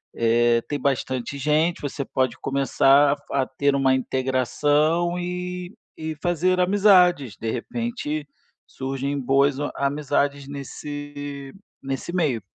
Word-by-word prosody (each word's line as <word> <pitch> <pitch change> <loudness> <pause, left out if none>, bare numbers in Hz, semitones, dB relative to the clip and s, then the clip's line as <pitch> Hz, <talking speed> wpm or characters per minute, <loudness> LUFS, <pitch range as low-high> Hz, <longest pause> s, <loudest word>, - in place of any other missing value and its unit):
eh, 115 +1 +3
tem 145 - -3
bastante 130 -1 -2
gente, 155 +4 +1
você 140 -1 -3
pode 130 -2 -1
começar 140 +1 +4
a - - +3
f 145 - -8
a 135 -2 +1
ter 140 +1 0
uma 135 -1 +3
integração 145 +7 +1
e 180 +1 -5 0.2
e 160 0 -4
fazer 180 +2 +1
amizades, 180 - +4
de 110 -1 -2
repente 155 - -4 0.4
surgem 135 +1 -3
boas 135 +1 +2
o 145 - -2
amizades 140 0 -1
nesse 145 0 -7 0.3
nesse 135 +4 -4
meio. 145 - +1
140 Hz, 125 wpm, -23 LUFS, 135-160 Hz, 0.4 s, começar